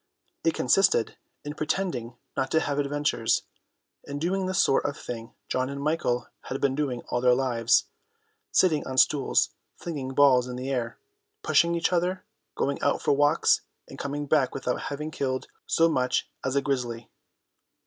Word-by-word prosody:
It -, -, +2 dB
consisted -, -, +3 dB, 0.3 s
in 145 Hz, -, -5 dB
pretending 150 Hz, -7 st, -2 dB, 0.2 s
not 135 Hz, -, -1 dB
to 160 Hz, -, +3 dB
have 145 Hz, -2 st, -1 dB
adventures, 145 Hz, -5 st, 0 dB, 0.6 s
in 140 Hz, -, -5 dB
doing 185 Hz, +5 st, -1 dB
the 185 Hz, -, -2 dB
sort 135 Hz, -, +3 dB
of 145 Hz, -, -2 dB
thing 115 Hz, -2 st, -7 dB
John 130 Hz, +1 st, -1 dB
and 140 Hz, 0 st, -5 dB
Michael 140 Hz, -5 st, 0 dB, 0.2 s
had 135 Hz, -, -4 dB
been 140 Hz, -2 st, +1 dB
doing 135 Hz, -4 st, -2 dB
all 120 Hz, -, 0 dB
their 125 Hz, 0 st, +5 dB
lives, 125 Hz, -2 st, +2 dB, 0.7 s
sitting 160 Hz, -5 st, +3 dB
on 130 Hz, -, -5 dB
stools 140 Hz, +1 st, +3 dB, 0.2 s
flinging 135 Hz, -6 st, -5 dB
balls 130 Hz, -3 st, +5 dB
in 125 Hz, -, -5 dB
the 130 Hz, +2 st, -4 dB
air, 120 Hz, -3 st, -2 dB, 0.5 s
pushing 170 Hz, -, +3 dB
each 170 Hz, +1 st, 0 dB
other, 180 Hz, +2 st, 0 dB, 0.3 s
going 140 Hz, 0 st, -1 dB
out -, -, +2 dB
for -, -, +1 dB
walks 145 Hz, +2 st, +3 dB, 0.3 s
and -, -, -11 dB
coming 145 Hz, +1 st, -3 dB
back 140 Hz, -3 st, +2 dB
without 125 Hz, -2 st, -2 dB
having 150 Hz, +2 st, -4 dB
killed 130 Hz, -3 st, -2 dB, 0.2 s
so 165 Hz, -, +4 dB
much 125 Hz, -5 st, 0 dB, 0.2 s
as 130 Hz, +1 st, -1 dB
a 140 Hz, -, +2 dB
grizzly. 120 Hz, -5 st, -3 dB
140 Hz, 165 wpm, -27 LUFS, 125-150 Hz, 0.7 s, their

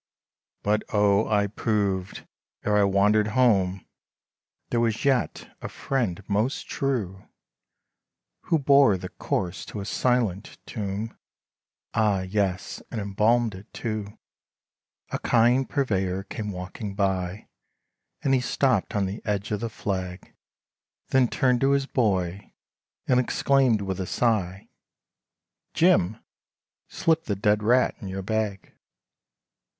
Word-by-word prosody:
But 105 Hz, +1 st, +2 dB
O 105 Hz, 0 st, +3 dB
I 105 Hz, -2 st, +2 dB
proved, 100 Hz, -3 st, -2 dB, 0.4 s
ere 105 Hz, -, +2 dB
I 105 Hz, -, +5 dB
wandered 100 Hz, +2 st, +3 dB
home, 100 Hz, -7 st, +3 dB, 0.9 s
There 120 Hz, -1 st, +2 dB
yet 125 Hz, +4 st, 0 dB
was -, -, -19 dB
a -, -, -5 dB
friend 110 Hz, -8 st, -2 dB
most 105 Hz, +6 st, -1 dB
true, 110 Hz, -9 st, -2 dB, 1.2 s
Who 165 Hz, -, +2 dB
bore 140 Hz, -7 st, +5 dB
the -, -, -7 dB
corse 85 Hz, -4 st, -3 dB
to 105 Hz, -, -7 dB
a 100 Hz, -, -5 dB
silent 115 Hz, -4 st, 0 dB
tomb, 105 Hz, +1 st, -4 dB, 0.8 s
Ah! 105 Hz, -4 st, +2 dB
yes, 95 Hz, 0 st, -2 dB
and 115 Hz, -, -4 dB
embalmed 105 Hz, +3 st, +2 dB
it 95 Hz, +4 st, -12 dB
too, 110 Hz, -3 st, -4 dB, 0.9 s
A -, -, -2 dB
kind 120 Hz, +3 st, +3 dB
purveyor 95 Hz, -8 st, 0 dB
came 105 Hz, +1 st, -5 dB
walking 95 Hz, +2 st, -6 dB
by, 95 Hz, -1 st, -1 dB, 0.8 s
And 135 Hz, -, +2 dB
he 130 Hz, -, +3 dB
stopped 120 Hz, -4 st, +1 dB
on 100 Hz, -1 st, +1 dB
the 95 Hz, +3 st, -5 dB
edge 105 Hz, -1 st, -2 dB
of 105 Hz, -, 0 dB
the 115 Hz, -, -3 dB
flag, 95 Hz, -4 st, -5 dB, 0.8 s
Then 130 Hz, -2 st, +4 dB
turned 125 Hz, 0 st, +1 dB
to 135 Hz, +1 st, +4 dB
his 140 Hz, -1 st, +1 dB
boy, 100 Hz, -7 st, -1 dB, 0.6 s
and 125 Hz, -1 st, +4 dB
exclaimed 130 Hz, -2 st, +2 dB
with 95 Hz, -1 st, -3 dB
a 95 Hz, -, -3 dB
sigh, 100 Hz, -6 st, 0 dB, 1.1 s
"Jim, 135 Hz, -, +3 dB, 0.7 s
slip 165 Hz, 0 st, 0 dB
the 100 Hz, -, -1 dB
dead 105 Hz, +2 st, +2 dB
rat 125 Hz, +4 st, +3 dB
in 100 Hz, -, -6 dB
your 95 Hz, 0 st, -4 dB
bag." 105 Hz, -1 st, -2 dB
105 Hz, 125 wpm, -25 LUFS, 95-120 Hz, 1.2 s, I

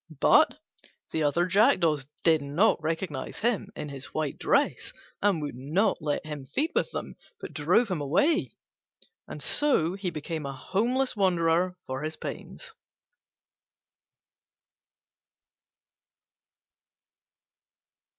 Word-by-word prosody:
But -, -, +5 dB, 0.5 s
the 160 Hz, -, -1 dB
other 155 Hz, +4 st, +2 dB
jackdaws 170 Hz, -, +3 dB, 0.2 s
did 160 Hz, -3 st, +4 dB
not 150 Hz, +8 st, +2 dB
recognise 160 Hz, -3 st, -3 dB
him 235 Hz, -1 st, 0 dB
in 150 Hz, -1 st, -5 dB
his 140 Hz, -1 st, -8 dB
white 155 Hz, -3 st, -2 dB
dress, -, -, +1 dB, 0.3 s
and 195 Hz, -6 st, +2 dB
would 145 Hz, -, -4 dB
not 150 Hz, -, 0 dB
let 150 Hz, 0 st, -2 dB
him 150 Hz, -3 st, -6 dB
feed 310 Hz, -, -1 dB
with -, -, +1 dB
them, -, -, -6 dB, 0.2 s
but -, -, -8 dB
drove 180 Hz, +9 st, +2 dB
him 170 Hz, -5 st, -1 dB
away: 275 Hz, -, +1 dB, 0.7 s
and -, -, -6 dB
so 185 Hz, -, +3 dB
he 195 Hz, -1 st, -3 dB
became 155 Hz, 0 st, -5 dB
a 135 Hz, -, -5 dB
homeless 245 Hz, -, 0 dB
wanderer 180 Hz, -2 st, +2 dB
for 130 Hz, +1 st, -4 dB
his 155 Hz, +1 st, -3 dB
pains. -, -, -8 dB
165 Hz, 110 wpm, -27 LUFS, 150-195 Hz, 0.7 s, But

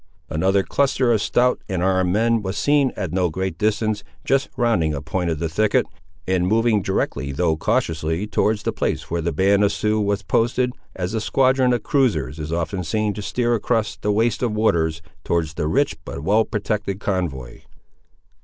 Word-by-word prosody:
Another 95 Hz, +5 st, +2 dB
cluster 135 Hz, -1 st, +1 dB
of 110 Hz, -, +1 dB
stout 125 Hz, +4 st, +2 dB
and 90 Hz, -2 st, -1 dB
armed 95 Hz, -1 st, +2 dB
men 115 Hz, +3 st, +2 dB
was 95 Hz, -1 st, -4 dB
seen 145 Hz, -2 st, +3 dB
at 95 Hz, -6 st, -3 dB
no 90 Hz, -1 st, +1 dB
great 95 Hz, 0 st, -4 dB
distance, 110 Hz, 0 st, 0 dB, 0.2 s
just 135 Hz, +1 st, +1 dB
rounding 90 Hz, -11 st, +1 dB
a -, -, -3 dB
point 90 Hz, +2 st, -2 dB
of 80 Hz, -, -1 dB
the 85 Hz, -, -2 dB
thicket, 105 Hz, +6 st, +2 dB, 0.4 s
and 90 Hz, -1 st, +1 dB
moving 110 Hz, 0 st, +2 dB
directly 70 Hz, -7 st, -2 dB
though 80 Hz, +3 st, +1 dB
cautiously 80 Hz, +3 st, -1 dB
towards 105 Hz, 0 st, 0 dB
the -, -, -1 dB
place -, -, -2 dB
where 85 Hz, 0 st, 0 dB
the 85 Hz, +1 st, -1 dB
band 100 Hz, +5 st, +3 dB
of 100 Hz, -, +4 dB
the -, -, -4 dB
Siouxes 105 Hz, 0 st, 0 dB
was 100 Hz, 0 st, 0 dB
posted, 120 Hz, +5 st, +1 dB, 0.2 s
as 90 Hz, +2 st, -3 dB
a 110 Hz, -, -1 dB
squadron 130 Hz, +2 st, +3 dB
of 120 Hz, -3 st, 0 dB
cruisers 80 Hz, -, 0 dB
is 75 Hz, 0 st, -5 dB
often 85 Hz, +3 st, -2 dB
seen 105 Hz, +5 st, -1 dB
to 105 Hz, -, -6 dB
steer 120 Hz, +3 st, 0 dB
across 110 Hz, -1 st, 0 dB
the 105 Hz, -, -1 dB
waste 110 Hz, +2 st, +1 dB
of 120 Hz, -4 st, 0 dB
waters, 85 Hz, -7 st, +1 dB, 0.2 s
towards 80 Hz, -2 st, -1 dB
the 75 Hz, -, -2 dB
rich 140 Hz, -, +1 dB
but 70 Hz, -, -7 dB
well 105 Hz, +6 st, +3 dB
protected 105 Hz, -2 st, -2 dB
convoy. 85 Hz, -12 st, -3 dB
100 Hz, 190 wpm, -22 LUFS, 85-110 Hz, 0.4 s, of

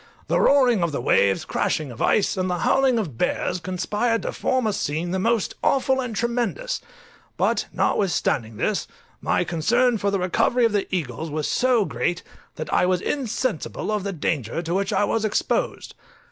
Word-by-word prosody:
The -, -, +1 dB
roaring 255 Hz, -7 st, +4 dB
of 170 Hz, -4 st, 0 dB
waves, 100 Hz, -6 st, +2 dB
crashing 150 Hz, -5 st, -1 dB
of 120 Hz, -, -9 dB
ice, 210 Hz, -, +2 dB
and 185 Hz, -1 st, -1 dB
the 180 Hz, -, 0 dB
howling 265 Hz, -2 st, +3 dB
of 160 Hz, -, -3 dB
bears, 180 Hz, 0 st, 0 dB
conspired 210 Hz, +6 st, -1 dB
to -, -, -2 dB
form 260 Hz, -2 st, 0 dB
a 215 Hz, -, +1 dB
scene 165 Hz, +1 st, -2 dB
the 190 Hz, -, 0 dB
most 230 Hz, +2 st, +1 dB
awful 265 Hz, -1 st, +2 dB
and 240 Hz, -4 st, -4 dB
tremendous: 240 Hz, -, -1 dB, 0.6 s
but -, -, +1 dB
notwithstanding 120 Hz, -, 0 dB
this, -, -, -1 dB, 0.3 s
my -, -, +1 dB
concern 235 Hz, +9 st, +1 dB
for 200 Hz, -, +1 dB
the 200 Hz, -, 0 dB
recovery 195 Hz, +7 st, +2 dB
of 230 Hz, -, +2 dB
the 205 Hz, -1 st, 0 dB
eagles 160 Hz, -3 st, -3 dB
was 150 Hz, 0 st, -2 dB
so 245 Hz, -4 st, +2 dB
great, 175 Hz, -1 st, -2 dB, 0.3 s
that -, -, -5 dB
I 180 Hz, -, +3 dB
was 185 Hz, -1 st, +2 dB
insensible 250 Hz, -, -2 dB
of 210 Hz, -2 st, -1 dB
the 200 Hz, -, -2 dB
danger 155 Hz, -, -2 dB
to 170 Hz, +1 st, -3 dB
which 195 Hz, +1 st, 0 dB
I -, -, +2 dB
was 220 Hz, +1 st, 0 dB
exposed. -, -, -1 dB
200 Hz, 175 wpm, -23 LUFS, 170-235 Hz, 0.6 s, roaring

